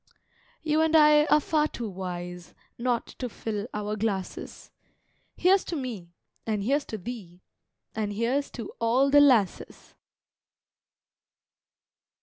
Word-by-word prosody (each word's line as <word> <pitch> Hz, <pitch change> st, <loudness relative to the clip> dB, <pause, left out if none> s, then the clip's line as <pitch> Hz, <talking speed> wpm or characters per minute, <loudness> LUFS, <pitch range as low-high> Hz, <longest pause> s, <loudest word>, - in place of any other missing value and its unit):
You 310 Hz, 0 st, +2 dB
and 320 Hz, 0 st, +2 dB
I 300 Hz, -1 st, +6 dB
are 305 Hz, -, +4 dB
far 300 Hz, 0 st, +1 dB
too 235 Hz, -6 st, -6 dB
wise 180 Hz, -2 st, -7 dB, 0.2 s
Not 240 Hz, -1 st, -1 dB
to 250 Hz, -, -3 dB
fill 215 Hz, -1 st, -4 dB
our 210 Hz, 0 st, -3 dB
glasses. 200 Hz, -3 st, -4 dB, 0.6 s
Here's 380 Hz, +2 st, +3 dB
to 340 Hz, -, -4 dB
me 235 Hz, -, -5 dB, 0.3 s
and 215 Hz, -3 st, -2 dB
here's 280 Hz, +6 st, +1 dB
to 220 Hz, -, -6 dB
thee, 185 Hz, -4 st, -9 dB, 0.5 s
And 215 Hz, -1 st, -2 dB
here's 240 Hz, +7 st, -1 dB
to 235 Hz, -, -6 dB
all 250 Hz, +4 st, +2 dB
the 290 Hz, -, +7 dB
lasses! 240 Hz, -10 st, +1 dB
230 Hz, 125 wpm, -27 LUFS, 205-285 Hz, 0.6 s, the